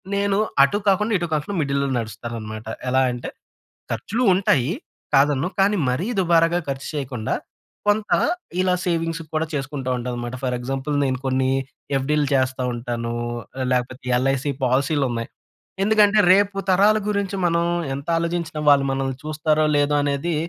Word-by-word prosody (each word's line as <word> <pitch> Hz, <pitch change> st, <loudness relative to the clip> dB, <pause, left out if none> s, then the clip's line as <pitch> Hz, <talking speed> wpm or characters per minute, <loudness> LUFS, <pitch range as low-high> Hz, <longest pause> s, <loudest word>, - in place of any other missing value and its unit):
నేను 200 Hz, 0 st, +1 dB, 0.3 s
అటూ, 140 Hz, +9 st, +2 dB
కాకుండా 210 Hz, +3 st, +2 dB
ఇటూ 175 Hz, -1 st, -3 dB
కాకుండా 155 Hz, +7 st, -2 dB
మిడిల్‌లో 140 Hz, -1 st, 0 dB
నడుస్తాననమాట. 110 Hz, 0 st, -6 dB, 0.2 s
ఎలా 130 Hz, +1 st, +3 dB
అంటే, 120 Hz, 0 st, -5 dB, 0.6 s
ఖర్చులూ 205 Hz, -, -1 dB
ఉంటాయి. 150 Hz, -8 st, +2 dB, 0.4 s
కాదనను. 140 Hz, +3 st, +3 dB
కానీ 200 Hz, +2 st, +3 dB
మరీ 165 Hz, +11 st, -1 dB
దుబారాగా 170 Hz, -1 st, +3 dB
ఖర్చు 135 Hz, 0 st, -4 dB
చెయ్యకుండా, 130 Hz, -6 st, -3 dB, 0.5 s
కొంత 210 Hz, 0 st, +1 dB, 0.5 s
ఇలా 185 Hz, -1 st, +2 dB
సేవింగ్సుకు 165 Hz, -2 st, -2 dB
కూడా 160 Hz, +1 st, +1 dB
చేసుకుంటా 135 Hz, -2 st, -3 dB
ఉంటానమాట. 120 Hz, 0 st, -4 dB
ఫర్ 125 Hz, -1 st, 0 dB
ఎగ్జాంపుల్, 135 Hz, +3 st, -3 dB
నేను 130 Hz, -1 st, 0 dB
కొన్నీ 130 Hz, 0 st, +1 dB, 0.5 s
ఎఫ్‌డీలు 150 Hz, +2 st, +1 dB
చేస్తా 130 Hz, -1 st, +1 dB
ఉంటానూ, 120 Hz, -1 st, -3 dB, 0.6 s
లేకపోతే 125 Hz, +1 st, -2 dB
ఎల్‌ఐసీ 135 Hz, +2 st, 0 dB
పాలసీలున్నాయి. 130 Hz, -2 st, 0 dB, 0.6 s
ఎందుకంటే, 215 Hz, 0 st, +4 dB
రేపు 200 Hz, 0 st, +3 dB
తరాల 205 Hz, +4 st, +5 dB
గురించి 200 Hz, -1 st, -1 dB
మనం 170 Hz, 0 st, +2 dB, 0.3 s
ఎంతాలోజించినా 165 Hz, +2 st, -2 dB
వాళ్ళు 140 Hz, -1 st, +5 dB
మనల్ని 135 Hz, -1 st, -2 dB
చూస్తారో, 155 Hz, 0 st, +1 dB
లేదో 145 Hz, 0 st, +2 dB
అనేది 145 Hz, +4 st, -1 dB
145 Hz, 130 wpm, -22 LUFS, 130-175 Hz, 0.6 s, తరాల